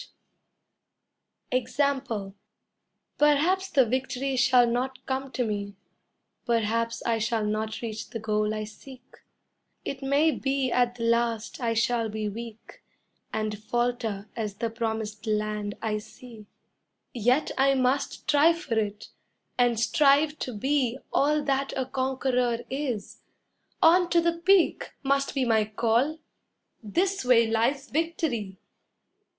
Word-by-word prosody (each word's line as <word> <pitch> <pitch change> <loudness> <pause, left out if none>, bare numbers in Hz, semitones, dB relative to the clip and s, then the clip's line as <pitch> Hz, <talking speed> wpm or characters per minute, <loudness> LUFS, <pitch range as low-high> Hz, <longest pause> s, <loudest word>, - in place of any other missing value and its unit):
] - - -53
EXAMPLE 255 -6 -2 0.9
Perhaps 320 +7 +3
the 275 -8 +4
victory 260 +2 -2
shall 250 -1 +5
not 255 +2 -2
come 265 0 -3
to 250 +1 0
me, 205 -2 -4 0.7
Perhaps 230 0 0
I 230 -1 +1
shall 220 0 0
not 215 +1 -2
reach 220 -2 -5
the 235 - -5
goal 215 -1 0
I 215 0 -3
seek, 255 +4 -13 0.7
It 275 0 -4
may 285 +4 +3
be 270 -3 -1
at 245 0 +2
the 235 - -5
last 230 -1 0
I 230 -1 0
shall 230 0 +1
be 215 0 -3
weak 225 +1 -9 0.5
And 215 -1 -2
falter 235 -3 -2
as 215 -3 -3
the 230 +2 -3
promised 220 -1 -4
land 210 -1 -1
I 215 -1 0
see; 220 0 -13 0.7
Yet 245 +5 +2
I 275 0 +3
must 260 +2 0
try 300 +3 +5
for 295 -10 -2
it 210 -1 -4 0.5
and 240 -2 +2
strive 290 +5 +3
to 255 - -3
be 265 0 0 0.2
All 300 +1 +2
that 275 -1 0
a 260 - 0
conqueror 260 -2 0
is. 260 -7 -4 0.6
On 350 +2 +6
to 345 - +4
the 340 0 +2
peak, 360 +1 +2
Must 275 +1 0
be 265 -2 +1
my 220 -2 +3
call 230 +8 +1 0.6
this 365 - 0
way 245 -2 +5
lies 235 +6 0
victory! 295 - -2
245 Hz, 130 wpm, -27 LUFS, 220-275 Hz, 0.9 s, On